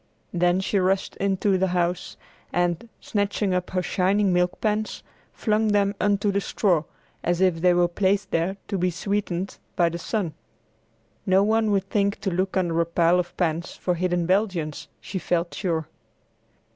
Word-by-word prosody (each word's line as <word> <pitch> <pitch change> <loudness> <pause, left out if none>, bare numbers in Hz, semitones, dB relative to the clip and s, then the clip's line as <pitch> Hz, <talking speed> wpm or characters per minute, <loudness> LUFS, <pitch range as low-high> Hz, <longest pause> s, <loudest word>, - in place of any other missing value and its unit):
Then 175 +1 +2
she 195 +1 +1
rushed 190 +1 0
into 195 0 +1
the 190 - +2
house 175 +1 -1 0.3
and, 175 +5 0
snatching 205 -1 0
up 180 0 -1
her 185 -1 -1
shining 190 +2 +2
milk 180 0 +1
pans, 215 0 -1 0.3
flung 215 0 +1
them 205 -1 +3
upon 205 -1 +3
the 200 0 0
straw, 175 -6 +1 0.4
as 175 0 +1
if 185 -3 +2
they 180 0 +5
were 175 0 +4
placed 195 +2 0
there 175 +4 0
to 195 - -1
be 180 +1 +2
sweetened 195 0 -2 0.2
by 175 -3 +3
the 170 +1 -5
sun. 180 -3 -2 0.9
No 190 +1 +5
one 220 +1 +2
would 195 -2 +1
think 200 0 0
to 195 - -1
look 185 +2 -1
under 170 -3 +1
a - - +1
pile 170 +1 +3
of 175 -1 -4
pans 170 -1 -1
for 180 - -1
hidden 175 0 0
Belgians, 180 -5 0
she 190 - -5
felt 170 -1 -1
sure. 165 -4 -2
185 Hz, 170 wpm, -25 LUFS, 175-200 Hz, 0.9 s, they